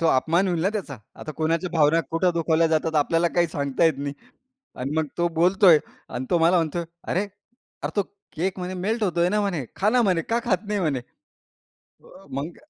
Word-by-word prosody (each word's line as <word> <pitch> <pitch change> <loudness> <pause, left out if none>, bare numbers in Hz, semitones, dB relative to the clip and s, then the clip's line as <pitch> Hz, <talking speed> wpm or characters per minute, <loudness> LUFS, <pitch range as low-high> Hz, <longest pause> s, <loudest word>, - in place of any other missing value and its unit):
तो 165 - +2
अपमान 165 +7 +2
होईल 175 -3 0
ना 190 - +3
त्याचा, 185 - -4 0.2
आता 155 - -6
कोणाच्या 165 +2 0
भावना 160 0 +3
कुठं 170 +2 +2
दुखावल्या 165 0 +2
जातात, 160 0 0
आपल्याला 165 +3 +2
काही 175 -1 +3
सांगता 140 +1 0
येत 160 - +4
नाही 140 0 -4 0.7
आणि 130 +2 -3
मग 160 - +1
तो 175 - +2
बोलतोय 180 -2 +6 0.3
आणि 130 - -4
तो 175 - +3
मला 165 +2 +4
म्हणतोय, 170 +1 -1 0.2
"अरे, 190 +4 0 0.6
अरे, - - -2
तो 205 - +3 0.3
केक 185 +3 -2
म्हणे 180 +1 -4
मेल्ट 210 +5 -1
होतोय 175 -2 +2
ना," 210 - +1
म्हणे, 175 -10 -2
"खा," 205 - +2
म्हणे, 185 -6 +2
"का 230 +8 -1
खात 195 -6 +2
नाही," 205 -1 -1
म्हणे? 150 -7 0 1.1
अ, 195 - -16
मग 140 +6 -5
170 Hz, 195 wpm, -24 LUFS, 160-185 Hz, 1.1 s, बोलतोय